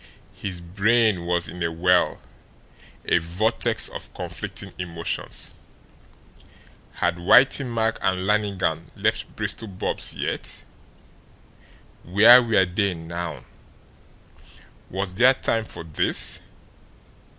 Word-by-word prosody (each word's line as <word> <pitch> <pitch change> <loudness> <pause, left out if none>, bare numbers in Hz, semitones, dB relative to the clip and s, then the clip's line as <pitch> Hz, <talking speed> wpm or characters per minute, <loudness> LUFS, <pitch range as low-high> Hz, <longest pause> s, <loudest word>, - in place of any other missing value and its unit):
His 90 -3 -6
brain 100 +1 +1
was 85 0 +1
in 90 - -9
a 85 0 0
whirl, 90 +2 +2 0.9
a - - +3
vortex 90 +8 +1
of - - -9
conflicting - - -6
emotions. 85 -2 -4 1.4
Had 85 0 -1
Whitey 130 +9 +4
Mack 115 -1 0
and 95 0 0
Lannigan 100 -6 -1
left - - -1
Bristol 115 - -3
Bob's 95 -2 -3
yet? - - -4 1.4
Where 110 +8 +7
were 110 -5 +3
they 95 +1 -1
now? 85 +1 -6 1.4
Was 95 0 -3
there 125 +7 +5
time 115 -3 0
for - - -7
this? 80 -2 +1
95 Hz, 100 wpm, -23 LUFS, 85-110 Hz, 1.4 s, Where